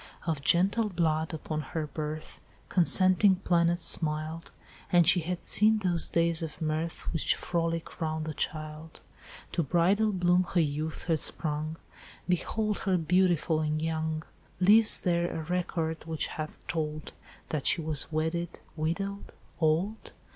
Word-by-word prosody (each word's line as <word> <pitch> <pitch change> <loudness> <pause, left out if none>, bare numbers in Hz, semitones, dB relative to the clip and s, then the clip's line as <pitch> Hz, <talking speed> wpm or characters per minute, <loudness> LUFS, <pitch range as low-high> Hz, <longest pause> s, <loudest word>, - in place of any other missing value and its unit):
"'Of 160 -5 -2
gentle 195 +9 +2
blood, 160 -3 0
upon 155 -1 -4
her 155 +2 -4
birth 155 +1 -6 0.3
Consenting 185 +2 +4
planets 175 -2 +1
smiled, 155 +1 0 0.4
And 175 -2 +5
she 180 - +6
had 175 +2 -4
seen 215 +1 +6
those 180 -5 +1
days 170 -1 +2
of 160 -2 -6
mirth 160 +1 -2
Which 160 - +1
frolic 165 -1 -3
round 155 -1 -2
the 155 - -4
child: 155 +1 -5 0.5
To - - 0
bridal 185 +8 +2
bloom 180 -1 +2
her - - +5
youth 155 0 -2
had 165 -3 0
sprung, 155 +1 -2 0.5
Behold 210 +4 -1
her 190 -2 +1
beautiful 175 -1 +2
and 155 0 -1
young; 160 0 -2 0.4
Lives 210 +4 +6
there 170 -1 0
a - - -5
record 165 -2 -3
which 160 -1 -2
hath 155 -1 -7
told 155 -1 -4 0.4
That 150 -3 -1
she - - +4
was 155 -1 -1
wedded, 160 +2 -2 0.2
widowed, 195 +6 -3 0.3
old? 170 +7 0
165 Hz, 140 wpm, -28 LUFS, 155-180 Hz, 0.5 s, she